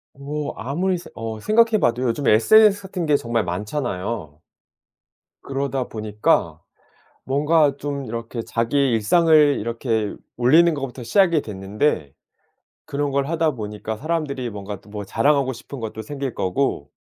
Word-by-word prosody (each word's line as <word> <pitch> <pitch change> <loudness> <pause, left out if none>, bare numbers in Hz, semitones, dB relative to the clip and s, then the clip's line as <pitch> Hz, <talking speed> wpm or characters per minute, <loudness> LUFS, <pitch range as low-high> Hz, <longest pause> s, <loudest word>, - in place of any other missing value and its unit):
어 145 +2 -4
아무리 175 +10 -1
스 - - -12
어 110 -1 -5
생각해 220 - +3
봐도 120 -3 +1
요즘에 125 0 +2
sns 205 - +5
같은 185 -3 -4
게 145 -1 +4
정말 115 -3 -1
많잖아요. 95 - -4 1.0
그러다 135 -1 -2
보니까 105 -1 0 0.7
뭔가 145 +1 +3
좀 140 -1 -4
이렇게 115 0 -5
자기의 125 +4 0
일상을 150 +5 +4
이렇게 115 -1 -2 0.2
올리는 160 +8 +5
것부터 135 -4 -5
시작이 170 - +3
됐는데 95 - -2 0.7
그런 145 0 -2
걸 140 0 0
하다 160 0 +1
보니까 105 -2 -5
사람들이 145 -4 -2
뭔가 100 -1 -7
또 - - -19
뭐 105 0 -6
자랑하고 140 +4 +2
싶은 130 +3 -9
것도 110 -1 -5
생길 135 +2 -5
거고 95 - -1
130 Hz, 305 characters per minute, -22 LUFS, 110-150 Hz, 1.0 s, sns